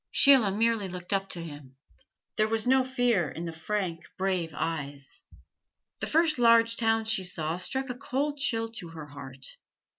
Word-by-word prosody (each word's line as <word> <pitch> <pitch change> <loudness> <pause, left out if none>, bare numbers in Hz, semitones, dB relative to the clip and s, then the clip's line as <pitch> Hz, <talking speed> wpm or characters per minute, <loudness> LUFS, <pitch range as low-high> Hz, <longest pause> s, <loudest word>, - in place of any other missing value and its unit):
Sheila 265 -7 +6
merely 225 0 +1
looked 180 +2 -4
up 195 0 0
to 170 - -3
him; 145 -4 -10 0.6
there 215 - +2
was 225 +1 +1
no 260 +1 +4
fear 245 - +1
in 165 +5 -6
the 165 - -5
frank, 170 0 -3
brave 185 -4 -1
eyes. 145 -3 -5 0.8
The - - -3
first 315 -3 +2
large 230 -1 +5
town 225 -1 +1
she 220 -3 +1
saw 165 -2 -1
struck 265 +9 -2
a - - -3
cold 280 +3 -2
chill 225 -4 +2
to 225 -6 -7
her 160 -2 -9
heart. 135 -2 -8
200 Hz, 170 wpm, -28 LUFS, 165-230 Hz, 0.8 s, Sheila